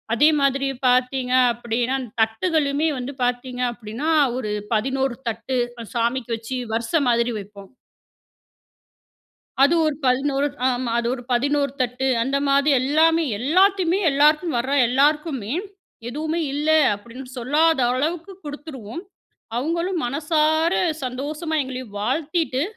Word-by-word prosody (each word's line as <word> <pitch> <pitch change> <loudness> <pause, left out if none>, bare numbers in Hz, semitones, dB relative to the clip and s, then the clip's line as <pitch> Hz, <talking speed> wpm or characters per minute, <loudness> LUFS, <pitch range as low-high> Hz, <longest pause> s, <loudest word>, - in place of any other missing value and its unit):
அதே 295 +6 +5
மாதிரி 275 0 +1 0.2
பார்த்தீங்க 250 0 +1 0.2
அப்பிடீனா, 240 +2 -2 0.3
தட்டுகளுமே 285 +6 +1
வந்து 250 +3 -5
பார்த்தீங்க 245 0 -2
அப்டீனா, 230 +6 -6 0.3
1 215 -5 -3 0.2
11 265 +3 0
தட்டு 230 +3 -3 0.4
சாமிக்கு 235 +1 -1
வச்சு, 230 +3 -6 0.2
வரிச 230 +6 -3
மாரி 235 0 +2
வைப்போம். 200 -1 -12 1.9
அது 285 +5 +5
1 305 -2 0
11 275 +2 +1 0.2
ஆமா 245 -1 -2
அது 235 - -2
ஒரு 250 -2 -7
11 280 +3 +1
தட்டு 250 +2 -1 0.2
அந்த 275 +2 0
மாரி 280 +2 +3
எல்லாமே, 320 +4 +3 0.2
எல்லாத்தையுமே, 370 - +3
எல்லாருக்கும் 300 +2 +3
வர 250 +3 -1 0.2
எல்லாருக்குமே, 275 -3 +1 0.6
எதுவுமே 315 +5 -2
இல்ல 295 +2 -1 0.3
அப்டீன்னு 250 +5 -11
சொல்லாத 300 +5 +2
அளவுக்கு 330 +8 -2
குடுத்துருவோம். 290 -3 -7 0.6
அவுங்களும் 335 +6 -1
மனசார 315 +4 +1 0.3
சந்தோஷமா 295 +6 -4
எங்களையும் 255 -5 -7
வாழ்த்திட்டு, 285 - -1
270 Hz, 110 wpm, -22 LUFS, 245-305 Hz, 1.9 s, அதே